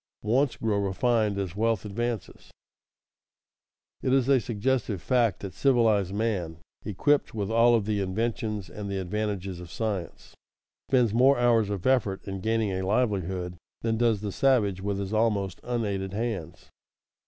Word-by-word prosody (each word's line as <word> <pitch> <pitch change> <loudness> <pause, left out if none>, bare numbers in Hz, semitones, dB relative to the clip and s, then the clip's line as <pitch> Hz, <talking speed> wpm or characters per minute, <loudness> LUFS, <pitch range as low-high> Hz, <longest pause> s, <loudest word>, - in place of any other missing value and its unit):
[Sidenote: 105 +2 0
Wants 135 0 +2
grow 110 -2 0
refined 105 +1 +1
as 95 -3 -3
wealth 110 -1 0
advances] 115 +2 -4 1.5
It 130 - 0
is 135 -1 +3
a 135 -2 +5
suggestive 115 -2 -1
fact 120 -2 +1
that 95 -3 -6
civilized 110 -7 +2
man, 100 -6 -2 0.3
equipped 125 +7 +1
with 105 0 -2
all 115 +1 +5
of 110 -3 0
the 105 -1 0
inventions 105 +1 -2
and 105 -1 -7
the 100 - -2
advantages 95 -1 -3
of 90 -1 -9
science, 100 -2 -4 0.6
spends 125 -5 +3
more 130 +4 +5
hours 115 -4 +3
of 100 -3 -4
effort 115 -8 +1
in 95 -1 -4
gaining 110 -1 0
a 95 0 -2
livelihood 95 -4 -1 0.3
than 115 -1 0
does 115 -3 +2
the 105 -1 -3
savage 105 -5 +2
with 100 0 -2
his 100 +1 -4
almost 105 -4 0
unaided 100 -6 -2
hands. 100 -7 -4
105 Hz, 155 wpm, -27 LUFS, 95-115 Hz, 1.5 s, a